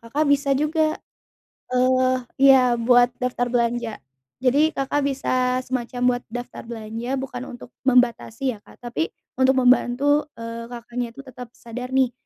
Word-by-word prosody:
Kakak 275 +7 -1
bisa 280 -1 +3
juga, 310 +1 +1 0.8
eee, 255 0 +3 0.2
iya, 260 -3 +6
buat 245 +1 +4
daftar 245 -1 -1
belanja. 235 -2 -1 0.4
Jadi 295 +5 +3
Kakak 280 +1 0
bisa 255 -2 0
semacam 250 0 -1
buat 245 - -13
daftar 245 +2 -7
belanja, 230 +2 -4
bukan 255 -1 -5
untuk 245 - -13 0.2
membatasi 250 0 +2
ya, - - -21
Kak. - - -17
Tapi 235 -10 -2 0.3
untuk 260 0 +4
membantu, 260 +4 +3
eee, 230 0 -6
Kakaknya 240 0 -5
itu - - -9
tetap 250 -2 -9
sadar 250 +2 -7
nih, 260 -2 +3
250 Hz, 140 wpm, -23 LUFS, 240-265 Hz, 0.8 s, iya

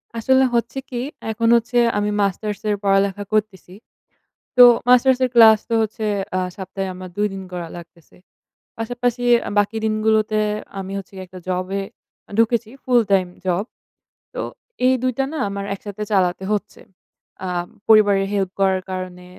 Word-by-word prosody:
আসলে 260 +3 +3
হচ্ছে 235 +3 -1
কি? 245 -2 -3 0.3
এখন 230 +1 -1
হচ্ছে 235 +1 0 0.2
আমি 205 0 0
মাস্টার্সের 210 +2 -1
পড়ালেখা 195 0 +1
করতেছি। 205 -4 -2 0.8
তো 250 - +10 0.3
মাস্টার্সের 255 +1 +4
ক্লাস 220 -2 +8
তো - - -1
হচ্ছে 220 0 -3 0.3
আ - - +1 0.2
সপ্তাহে 190 0 -5
আমার 185 0 -9
২ 210 0 +2
দিন 190 0 -6
করা 175 -2 -5
লাগতেছে। 170 -1 -15 0.6
পাশাপাশি 245 +1 -2 0.2
আ - - -2
বাকি 205 +2 0
দিনগুলোতে 215 0 +1 0.4
আমি 190 0 -6
হচ্ছে 195 0 -9
গিয়ে 190 0 -7
একটা 185 0 -11
জবে 185 +2 -2 0.5
এ - - -15
ঢুকেছি, 230 0 +2
ফুল 245 -2 +4
টাইম 190 -2 +3 0.2
জব। 185 +1 +1 0.7
তো - - -4 0.4
এই 260 - +5
২ 255 0 +1
টা 270 - +1
না - - -4
আমার 200 0 -5
একসাথে 205 +1 -7
চালাতে 185 -2 +1
হচ্ছে। 210 0 -3 0.6
আ - - -3 0.4
পরিবারের 205 -3 +5
হেল্প 195 -2 0
করার 190 -1 +2
কারণে, 185 -1 -6
205 Hz, 150 wpm, -21 LUFS, 190-225 Hz, 0.8 s, তো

